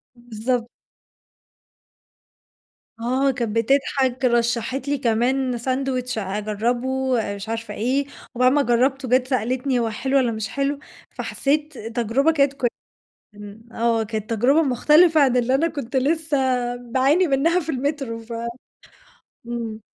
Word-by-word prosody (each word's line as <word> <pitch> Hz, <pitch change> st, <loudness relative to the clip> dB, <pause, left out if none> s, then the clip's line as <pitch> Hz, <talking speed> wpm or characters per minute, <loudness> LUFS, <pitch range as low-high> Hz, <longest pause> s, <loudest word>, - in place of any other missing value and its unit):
بالضبط. 240 Hz, 0 st, -3 dB, 2.3 s
آه 260 Hz, +4 st, +1 dB
كانت 235 Hz, -4 st, -3 dB
بتضحك، 260 Hz, +1 st, +1 dB
رشحت 240 Hz, +2 st, 0 dB
لي 285 Hz, 0 st, +1 dB
كمان 250 Hz, +1 st, 0 dB
ساندويتش 255 Hz, 0 st, -2 dB
أجربه، 215 Hz, +5 st, -2 dB, 0.5 s
مش 200 Hz, +2 st, -8 dB
عارفة 225 Hz, -1 st, -4 dB
إيه، 255 Hz, +7 st, 0 dB, 0.3 s
وبعد 255 Hz, +1 st, +4 dB
ما 290 Hz, +1 st, +3 dB
جربته، 260 Hz, +2 st, +1 dB
جت 255 Hz, +1 st, +3 dB
سألتني 255 Hz, +1 st, 0 dB
هو 230 Hz, -1 st, 0 dB
حلو 265 Hz, +5 st, 0 dB
والّا 250 Hz, -3 st, +2 dB
مش 220 Hz, -1 st, -4 dB
حلو، 280 Hz, 0 st, -1 dB, 0.3 s
فحسيت 295 Hz, +1 st, -2 dB
تجربة 230 Hz, +6 st, 0 dB
كانت 280 Hz, -3 st, +2 dB
ك 275 Hz, -, -3 dB, 0.7 s
إمم، 205 Hz, +1 st, -11 dB
آه، 230 Hz, -1 st, +1 dB
كانت 215 Hz, 0 st, -5 dB
تجربة 250 Hz, +8 st, +3 dB
مختلفة 310 Hz, +4 st, +4 dB
عن 265 Hz, -3 st, +4 dB
اللي 250 Hz, +1 st, +2 dB
أنا 320 Hz, +5 st, +2 dB
كنت 280 Hz, -5 st, -5 dB
لسه 300 Hz, +3 st, +1 dB, 0.4 s
باعاني 260 Hz, +8 st, +2 dB
منها 325 Hz, +5 st, +2 dB
في 320 Hz, -, -9 dB
المترو 270 Hz, -3 st, -2 dB
ف 225 Hz, +1 st, -11 dB, 1.2 s
إمم. 230 Hz, -2 st, -5 dB
255 Hz, 125 wpm, -22 LUFS, 230-275 Hz, 2.3 s, وبعد